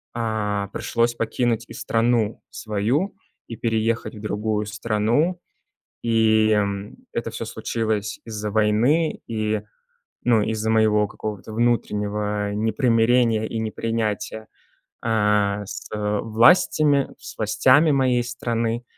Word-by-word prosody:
э, 105 -3 -1
пришлось 120 0 0
покинуть 115 0 -1
и - - -10
страну 115 -1 0
свою, 115 - -1 0.3
и 115 - -7
переехать 115 0 -1
в 105 - -10
другую 105 0 -1
страну. 115 - 0 0.6
И, 110 -1 +3
м, 100 -1 -1 0.2
это - - -3
всё - - -5
случилось 110 -2 -2
из-за 105 -2 -4
войны 110 +10 +2
и, 110 -2 -1 0.6
ну, 120 -3 +3
из-за 110 0 -1
моего 110 -2 +3
какого-то 105 0 -6
внутреннего 105 -3 0
непримирения 115 +1 +2
и 115 +1 -4
непринятия, 110 -1 -3 0.6
э, 105 -2 +2
с, - - -7
э, 105 -1 -1
властями, 140 +5 +4
с - - -10
властями 130 +8 +4
моей 130 -3 +2
страны. 120 -1 -2
110 Hz, 110 wpm, -23 LUFS, 105-120 Hz, 0.6 s, властями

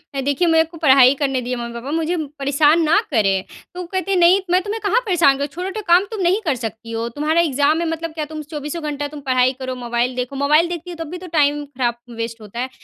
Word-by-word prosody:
अ, 270 - -1
"देखिए, 285 +6 +1
मेरे 325 -1 +5
को 330 +1 -12
पढ़ाई 270 -4 +6
करने 270 -2 0
दीजिए, 250 +1 -3
मम्मी-पापा। 235 +3 -6
मुझे 330 +2 -1 0.2
परेशान 290 +4 +3
ना 325 +6 +4
करें।" 195 -5 +2 0.3
तो 360 - -8
वो - - -6
कहते, 375 +1 -1
"नहीं, 355 +2 +5
मैं 365 +1 +4
तुम्हें 425 +2 -4
कहाँ 425 +4 +2
परेशान 345 -8 +4
कर - - -12
रहा? - - -1
छोटा-छोटा 385 +4 -4
काम 355 +3 +5
तुम 430 - -4
नहीं 365 +3 +2
कर 295 -5 +1
सकती 225 -1 -7
हो? 230 0 -2
तुम्हारा 310 +3 +2
एग्ज़ाम 295 0 +2
है, 335 - -1
मतलब 325 0 -4
क्या 310 -1 -3
तुम 310 0 -7
चौबीसों 300 +2 -5
घंटा 290 -1 -3
तुम 295 0 -9
पढ़ाई 255 0 +3
करो, 260 -1 -4
मोबाइल 240 +1 -1
देखो। 250 +2 -4
मोबाइल 300 +5 +3
देखती 345 0 -6
हो, 350 - -6
तब - - -10
भी 360 - -5
तो 365 +1 -10
टाइम 290 0 +2
ख़राब 250 -4 -2 0.2
वेस्ट 230 0 -5
होता 215 +2 -9
है।" 255 +1 -2
295 Hz, 250 wpm, -20 LUFS, 255-340 Hz, 0.3 s, पढ़ाई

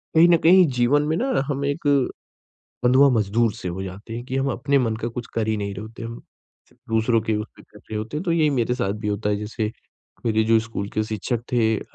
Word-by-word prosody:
कहीं 165 +2 +7
न 170 - +6
कहीं 180 +2 +7
जीवन 125 +4 +3
में 155 - +1
ना 260 - +1
हम 140 -1 -2
एक, 140 +2 -1 1.0
बंधुआ 130 +3 +6
मजदूर 110 +2 +2
से - - -7
हो 90 +2 -5
जाते 95 +4 -8
हैं 120 +1 -5
कि 130 - -4
हम 135 - 0
अपने 140 +3 +1
मन 115 -3 0
का 115 - -1
कुछ 120 0 -6
कर 110 -1 -1
ही 110 -1 0
नहीं 100 -1 -3
रहे 100 - -7
होते 115 +2 -9
हम, 115 0 -7 0.5
च - - -26 0.2
दूसरों 115 +1 +2
के 110 0 -1
उस 105 - -4
पे - - -15
कर - - -18
रहे 110 - -7
होते 110 +7 -4
हैं, 155 - -3
तो 175 - 0
यही 155 -3 +3
मेरे 125 -3 0
साथ 100 -5 -1
भी - - -1
होता 105 0 -1
है, 105 - +2
जैसे 105 +1 -3 0.5
मेरे 110 -1 +2
जो 115 0 +4
स्कूल 110 -3 -5
के 110 - +2
शिक्षक 110 +2 -3
थे 110 -2 +3
अ, - - -6
115 Hz, 250 wpm, -23 LUFS, 110-135 Hz, 1.0 s, कहीं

